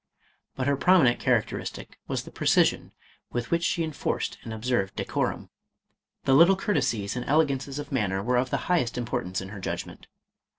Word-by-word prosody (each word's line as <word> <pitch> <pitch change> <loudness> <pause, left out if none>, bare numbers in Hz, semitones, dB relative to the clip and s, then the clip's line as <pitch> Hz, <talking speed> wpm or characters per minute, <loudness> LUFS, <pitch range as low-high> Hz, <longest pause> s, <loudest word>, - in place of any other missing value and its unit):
But 130 - -2
her 140 +1 +2
prominent 140 -5 +4
char 125 -3 +3
acteristic 105 - -7 0.2
was - - -2
the - - -12
precision - - +2 0.4
with 120 -1 -4
which 170 0 +2
she 170 0 +1
enforced 155 -2 -3
and 115 - -8
observed 110 -3 -1
decorum; - - -2 0.7
the 135 - +3
little 170 +7 +7
courtesies 115 - -1
and 125 - -3
ele 155 +3 +5
gances 140 0 -4
of 145 -1 -6
manner 100 -7 0
were 125 +3 +1
of 125 +1 +1
the - - -2
highest 145 -10 +1
importance 95 -6 -2
in 95 - -7
her 100 -1 -8
judgment. - - -6
125 Hz, 175 wpm, -27 LUFS, 110-145 Hz, 0.7 s, little